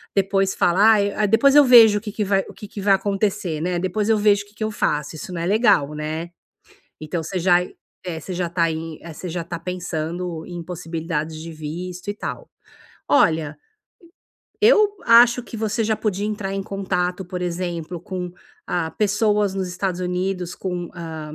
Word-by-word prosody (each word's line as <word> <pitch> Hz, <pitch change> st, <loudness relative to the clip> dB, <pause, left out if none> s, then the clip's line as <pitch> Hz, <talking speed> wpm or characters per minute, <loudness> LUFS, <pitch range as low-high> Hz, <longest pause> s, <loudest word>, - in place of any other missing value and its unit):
depois 195 Hz, 0 st, +2 dB
fala: 175 Hz, +2 st, +2 dB
"Ai 210 Hz, 0 st, +2 dB
depois 230 Hz, +7 st, +4 dB
eu 295 Hz, -, +9 dB
vejo 230 Hz, -4 st, +8 dB
o -, -, -19 dB
que 210 Hz, -1 st, -6 dB
que 210 Hz, +1 st, -2 dB
vai 195 Hz, 0 st, +1 dB
o -, -, -10 dB
que 210 Hz, -, -10 dB
que 205 Hz, -, -9 dB
vai 200 Hz, 0 st, +4 dB
acontecer, 195 Hz, -4 st, -1 dB
né? 175 Hz, +1 st, -1 dB
Depois 185 Hz, +4 st, -1 dB
eu 220 Hz, -, +4 dB
vejo 205 Hz, -1 st, +3 dB
o -, -, -23 dB
que 205 Hz, -, -23 dB
que 215 Hz, -, -4 dB
eu 215 Hz, -, 0 dB
faço!". 150 Hz, -6 st, -1 dB
Isso 180 Hz, +4 st, -7 dB
não 170 Hz, -, -3 dB
é -, -, -2 dB
legal, 200 Hz, -, +3 dB
né? 155 Hz, +3 st, -4 dB, 0.7 s
Então 160 Hz, +2 st, -3 dB
você 185 Hz, +4 st, -3 dB
já 175 Hz, 0 st, +4 dB
aí 180 Hz, +1 st, 0 dB, 0.5 s
você 185 Hz, -, -6 dB
já 175 Hz, -1 st, -2 dB
tá 170 Hz, 0 st, 0 dB
aí, 160 Hz, -1 st, -3 dB
eh 170 Hz, -1 st, -9 dB
você 180 Hz, +3 st, -7 dB
já 170 Hz, 0 st, -3 dB
tá 170 Hz, 0 st, -5 dB
pensando 175 Hz, -1 st, -4 dB
em 175 Hz, -1 st, -7 dB
possibilidades 165 Hz, -2 st, -4 dB
de 165 Hz, +1 st, -8 dB
visto 175 Hz, +5 st, -6 dB
e -, -, -1 dB
tal. 480 Hz, -, -6 dB, 0.6 s
Olha 160 Hz, -, +3 dB, 1.1 s
eu 425 Hz, -2 st, +5 dB
acho 240 Hz, +1 st, +6 dB
que 230 Hz, -, -8 dB
você 220 Hz, +1 st, -1 dB
já 220 Hz, 0 st, +1 dB
podia 205 Hz, -2 st, -2 dB
entrar 210 Hz, -2 st, -3 dB
em 195 Hz, 0 st, -3 dB
contato, 185 Hz, -2 st, -2 dB
por 180 Hz, +1 st, -5 dB
exemplo, 175 Hz, -1 st, -3 dB
com, 180 Hz, -1 st, -5 dB, 0.4 s
ah, 165 Hz, -2 st, -1 dB
pessoas 210 Hz, -1 st, +1 dB
nos 190 Hz, -1 st, -2 dB
Estados 180 Hz, 0 st, -3 dB
Unidos, 180 Hz, 0 st, -2 dB
com 180 Hz, -2 st, -4 dB
hã 165 Hz, -2 st, -6 dB
180 Hz, 190 wpm, -22 LUFS, 170-205 Hz, 1.1 s, eu